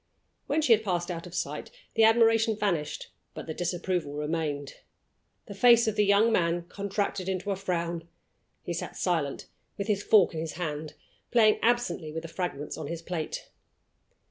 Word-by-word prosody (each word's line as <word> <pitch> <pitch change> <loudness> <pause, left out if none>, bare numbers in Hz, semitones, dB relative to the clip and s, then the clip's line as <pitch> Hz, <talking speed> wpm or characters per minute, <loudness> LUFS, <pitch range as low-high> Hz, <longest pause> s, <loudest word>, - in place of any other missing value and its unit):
When 310 +2 +1
she 240 - +6
had 220 0 +2
passed 175 -3 -1
out 170 0 -6
of 175 - -10
sight - - -3 0.2
the 225 -1 +5
admiration 225 0 +4
vanished, 175 -8 -2 0.2
but - - -6
the 160 - -4
disapproval 175 -2 -2
remained. 150 -1 -3 0.7
The - - -8
face 235 +2 +6
of 215 - 0
the 210 - +3
young 205 +3 +5
man 170 -4 +1
contracted 200 -1 -2
into 190 +2 -2
a - - 0
frown: 170 -3 -3 0.6
he - - -3
sat - - -5
silent, 160 -6 -1 0.3
with 200 - -2
his 205 -1 0
fork 205 -4 +5
in 160 - -4
his 160 -1 -4
hand, 155 -3 -4 0.3
playing 220 -3 +4
absently 225 -9 +1
with 160 +1 -5
the 165 - -7
fragments 165 -5 -4
on 155 - -5
his 165 +1 -5
plate. 165 -3 -4
180 Hz, 170 wpm, -28 LUFS, 165-210 Hz, 0.7 s, she